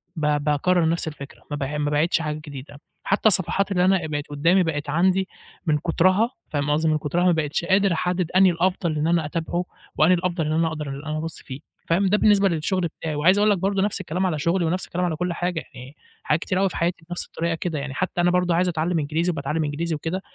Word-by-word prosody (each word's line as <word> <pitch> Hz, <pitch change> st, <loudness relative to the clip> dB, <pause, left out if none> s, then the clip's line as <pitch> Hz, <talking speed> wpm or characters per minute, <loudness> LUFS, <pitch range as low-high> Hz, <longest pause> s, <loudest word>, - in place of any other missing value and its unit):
ب 155 Hz, -, -2 dB, 0.2 s
باكرر 160 Hz, +3 st, +2 dB
نفس 165 Hz, 0 st, -1 dB
الفكرة 140 Hz, -3 st, -9 dB
ما 145 Hz, -, -2 dB
ب 140 Hz, -, -3 dB
ما 145 Hz, +2 st, -2 dB
باعيدش 160 Hz, +3 st, +2 dB
حاجة 150 Hz, 0 st, -3 dB
جديدة، 145 Hz, 0 st, -10 dB, 0.2 s
حتى 200 Hz, +3 st, +2 dB
الصفحات 195 Hz, +1 st, +2 dB
اللي 180 Hz, -1 st, +2 dB
أنا 190 Hz, 0 st, +4 dB
بقت 145 Hz, -1 st, -4 dB
قدامي 165 Hz, +6 st, +3 dB
بقت 145 Hz, -3 st, -3 dB
عندي 185 Hz, +4 st, +2 dB, 0.4 s
من 150 Hz, -2 st, +2 dB
كترها 185 Hz, -, +2 dB, 0.2 s
فاهم 145 Hz, -1 st, -1 dB
قصدي 155 Hz, +2 st, +2 dB
من 155 Hz, -, +2 dB
كترها 155 Hz, +4 st, -1 dB
ما 180 Hz, -, +5 dB
بقيتش 160 Hz, +1 st, -1 dB
قادر 195 Hz, -1 st, +3 dB
أحدد 180 Hz, +1 st, -1 dB
أنهي 185 Hz, 0 st, +5 dB
الأفضل 175 Hz, -2 st, 0 dB
إن 150 Hz, +2 st, 0 dB
أنا 170 Hz, -2 st, +2 dB
أتابعه 170 Hz, +3 st, -2 dB, 0.3 s
وأنهي 170 Hz, +4 st, +5 dB
الأفضل 175 Hz, -2 st, -1 dB
إن 155 Hz, -, -1 dB
أنا 165 Hz, +1 st, +2 dB
أقدر 155 Hz, -2 st, -4 dB
أنا 150 Hz, +3 st, -5 dB
أبص 160 Hz, 0 st, -6 dB
فيه 130 Hz, +1 st, -8 dB, 0.3 s
فاهم، 180 Hz, +4 st, +2 dB
ده 205 Hz, +2 st, +3 dB
بالنسبة 200 Hz, -2 st, +4 dB
للشغل 175 Hz, +3 st, -1 dB, 0.2 s
بتاعي 155 Hz, -2 st, -3 dB
وعايز 175 Hz, +7 st, +4 dB
أقول 210 Hz, +1 st, +4 dB
لك 200 Hz, -, +2 dB
برضه 195 Hz, +2 st, 0 dB
نفس 205 Hz, -1 st, -1 dB
الكلام 180 Hz, +1 st, -2 dB
على 165 Hz, -5 st, -1 dB
شغلي 170 Hz, +4 st, +1 dB
ونفس 180 Hz, +3 st, -1 dB
الكلام. 180 Hz, +1 st, -2 dB
على 160 Hz, -3 st, -1 dB
كل 180 Hz, +2 st, -2 dB
حاجة 175 Hz, -1 st, -2 dB
يعني 130 Hz, +3 st, -11 dB, 0.3 s
حاجات 150 Hz, -, +1 dB
كتير 185 Hz, 0 st, -1 dB
أوي 195 Hz, -, +2 dB
في -, -, -7 dB
حياتي 170 Hz, -1 st, -2 dB
بنفس 175 Hz, -, -4 dB
الطريقة 170 Hz, 0 st, -2 dB
كده 165 Hz, -2 st, -3 dB
يعني 140 Hz, -1 st, -5 dB
حتى 180 Hz, +2 st, -1 dB
أنا 175 Hz, 0 st, +3 dB
برضه 180 Hz, -1 st, +2 dB
عايز 180 Hz, +2 st, +2 dB
أتعلم 165 Hz, 0 st, 0 dB
إنجليزي 160 Hz, +4 st, 0 dB
وباتعلم 155 Hz, +1 st, -2 dB
إنجليزي 155 Hz, +3 st, -2 dB
وكده 165 Hz, +5 st, -3 dB
170 Hz, 230 wpm, -23 LUFS, 150-180 Hz, 0.4 s, ما